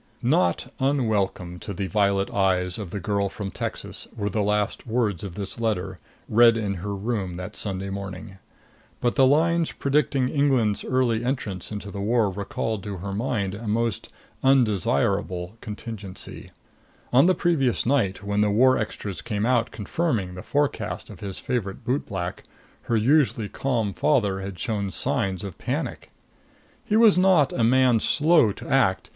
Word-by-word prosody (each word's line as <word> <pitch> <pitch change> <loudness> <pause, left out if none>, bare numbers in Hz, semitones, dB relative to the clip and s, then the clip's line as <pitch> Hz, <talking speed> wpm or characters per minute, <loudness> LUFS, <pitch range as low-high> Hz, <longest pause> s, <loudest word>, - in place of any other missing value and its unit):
Not 90 -2 +1
unwelcome 105 -10 0
to 100 - -6
the 100 - -2
violet 100 -1 +1
eyes 90 -1 +1
of 100 -5 -5
the 100 - -4
girl 100 +1 0
from 100 0 -6
Texas - - -5
were 105 -1 -2
the 105 - 0
last 105 +3 -1
words 110 -6 0
of 95 -4 -6
this 100 +2 -6
letter, 95 -5 -2 0.3
read 115 +1 +6
in 105 -3 -1
her 100 +1 -3
room 100 -3 -2
that 90 +3 -7
Sunday 95 -1 -3
morning. 95 -1 -7 0.6
But 120 -1 +1
the 135 -2 +5
lines 165 +4 +3
predicting 140 -2 +1
England's 130 -7 +1
early 120 -3 +1
entrance 115 -9 -3
into 105 -1 -6
the 100 - -5
war 110 -1 +2
recalled 100 +2 -3
to 100 -2 -5
her 100 +2 -5
mind 105 -3 -1
a 110 +2 -7
most 115 -1 -1 0.3
undesirable 105 -6 +1
contingency. 105 -3 -8 0.6
On 135 +7 +6
the 185 - +4
previous 145 -8 +1
night, 110 -8 +1
when 100 +1 0
the 105 - +3
war 130 +5 +4
extras 105 -3 -4
came 105 -2 -2
out 120 -2 +2
confirming 110 - -2
the 90 - -7
forecast 145 +5 -2
of - - -11
his 100 -2 -6
favorite 110 -3 -3
bootblack, 100 -9 -2 0.5
her 115 - +3
usually 120 -3 +2
calm 115 -7 -1
father 105 -10 +1
had 95 -1 -6
shown 100 +2 -2
signs 95 0 -1
of 100 -4 -7
panic. - - -3 0.7
He 210 - 0
was 220 -4 +6
not 180 -7 +4
a 115 - 0
man 125 0 +4
slow 155 -3 +4
to - - -9
act. 110 -8 +2
105 Hz, 160 wpm, -25 LUFS, 100-125 Hz, 0.7 s, read